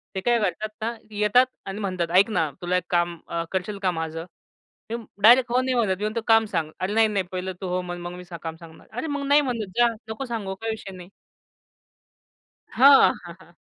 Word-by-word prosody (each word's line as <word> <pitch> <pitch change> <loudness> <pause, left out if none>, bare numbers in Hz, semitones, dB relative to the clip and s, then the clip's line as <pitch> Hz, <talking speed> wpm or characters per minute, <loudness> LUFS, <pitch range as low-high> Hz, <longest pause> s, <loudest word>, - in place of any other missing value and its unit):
ते 190 - -2
काय 240 +2 +2
करतात 215 +1 -1
ना, 225 +2 -1 0.2
येतात 210 +4 +4 0.2
आणि 195 +1 -5
म्हणतात 185 -5 -2
ऐक 200 +3 +5
ना 160 -7 +1
तुला 180 +1 +1
एक 180 - -2
काम 175 -1 +1
अ, 170 0 -2
करशील 190 +2 -3
का 185 - +3
माझं? 160 -1 -4 0.7
मी - - -1 0.3
डायरेक्ट 240 +3 +6
हो 250 +1 +3
नाही 260 0 -1
म्हणत. 210 -6 +1
मी 205 - -6
म्हणतो, 220 +2 -1
"काम 225 -1 +5
सांग. 165 -4 -1
अरे, 190 +2 -2
नाही, 225 0 +4
नाही 205 -3 -1
पहिलं 185 0 -4
तू 190 - -3
हो 180 +1 -1
मग 175 -1 -6 0.2
मी 180 - -9 0.2
काम 165 -1 -5
सांगणार. 165 -1 -15
अरे, 245 +8 -4
मग 285 -1 -3
नाही 290 +1 +5
म्हणत 240 -6 -3
जा 240 0 +6 0.2
नको 220 +5 -4
सांगू 215 -6 -4
काही 225 0 -2
विषय 220 -3 -7
नाही." 180 0 -11 1.6
हां, 275 +2 +7
हां, - - -9
हां. - - -19
205 Hz, 210 wpm, -24 LUFS, 180-230 Hz, 1.6 s, हां